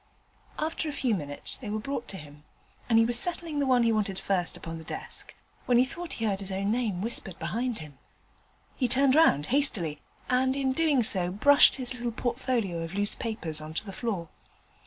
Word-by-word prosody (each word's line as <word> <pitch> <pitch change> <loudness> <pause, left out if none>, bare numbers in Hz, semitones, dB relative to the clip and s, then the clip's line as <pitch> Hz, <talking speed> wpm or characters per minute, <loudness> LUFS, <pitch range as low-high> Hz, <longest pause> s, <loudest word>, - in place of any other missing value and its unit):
After 315 0 -2
a - - -5
few 255 -4 0
minutes 145 -7 0
they 230 - -8
were 215 - -2
brought 240 +3 -4
to 195 - -4
him, 150 -1 -13 0.5
and 225 - +4
he 225 - +5
was 240 +1 +2
settling 335 -4 0
the 280 - 0
one 250 -2 +4
he 230 - +3
wanted 205 -3 -1
first 190 -3 -1
upon 165 0 -7
the - - -10
desk, - - -8 0.3
when 245 - +4
he 250 - +5
thought 345 +6 -6
he 225 - -3
heard 200 -3 0
his 195 -1 -4
own 195 +2 -1
name 220 -6 -1
whispered 205 -6 +2
behind 230 +8 -3
him. 150 -4 -10 0.8
He 255 - 0
turned 260 +2 +4
round 210 - +4
hastily, 190 - +1 0.3
and 260 +1 +1
in 270 -1 0
doing 295 -4 +2
so, 185 -5 +4
brushed 280 +10 +5
his 255 -1 -2
little 240 -1 -4
portfolio 235 -7 -2
of 165 +2 -6
loose 205 0 +2
papers 165 -9 -3
on 155 +1 -9
to 215 - 0
the 195 - -8
floor. 195 -9 -4
225 Hz, 205 wpm, -28 LUFS, 180-260 Hz, 0.8 s, he